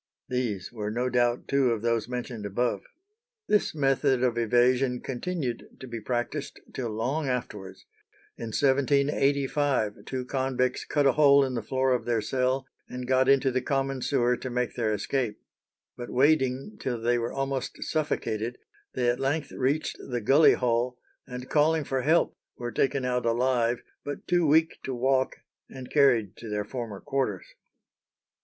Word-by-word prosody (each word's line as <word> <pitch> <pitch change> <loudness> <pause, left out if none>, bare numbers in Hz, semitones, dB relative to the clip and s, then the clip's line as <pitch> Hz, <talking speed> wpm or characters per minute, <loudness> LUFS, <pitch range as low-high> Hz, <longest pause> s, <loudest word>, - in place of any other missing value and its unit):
These 120 -7 -2
were 105 -3 -3
no 120 +4 -1
doubt 120 0 +1
two 140 -2 +3
of 115 -2 -1
those 115 0 0
mentioned 125 -3 -5
above. 110 +5 -1 0.7
This 210 -6 +2
method 135 -2 +2
of 125 -2 +2
evasion 125 +2 +2
continued 135 -2 -4
to - - -8
be 115 -3 -6
practised 125 +5 -3
till 120 -3 -3
long 130 +8 -2
afterwards. 105 -6 -5 0.5
In - - -6
1785 140 -1 +1
two 130 -1 -3
convicts 130 -1 -1
cut 145 -2 +1
a 135 - +6
hole 140 0 +5
in 130 - -3
the 120 - -2
floor 130 +2 +1
of 125 - -1
their 120 -2 +1
cell, 130 +4 0 0.2
and 125 0 -6
got 130 0 +3
into 135 -1 +4
the 130 0 0
common 135 -1 -1
sewer 125 -2 +2
to 130 - -6
make 125 0 -1
their 115 -3 0
escape. 105 +2 -1 0.6
"But 120 - -7
wading 135 +5 +2
till 120 -3 -2
they 120 +1 +1
were 115 0 -2
almost 135 -1 -3
suffocated, 120 -7 -2 0.4
they 125 -1 +1
at 120 +1 +1
length 140 +2 -1
reached 140 +4 -1
the 125 -2 -4
gully 135 +8 +6
hole, 125 0 0 0.3
and 125 0 -7
calling 155 +2 +3
for 135 -1 -1
help, 160 +5 +2 0.2
were 120 -1 -4
taken 135 0 0
out 125 -1 0
alive, 120 0 +1 0.2
but 145 - -6
too 175 -3 +3
weak 160 +2 +3
to 130 - -4
walk, 130 +1 +1 0.3
and 130 -1 -10
carried 125 -9 +4
to 115 - -8
their 105 0 -2
former 115 -4 -6
quarters." 135 -9 -2
125 Hz, 160 wpm, -27 LUFS, 120-135 Hz, 0.7 s, a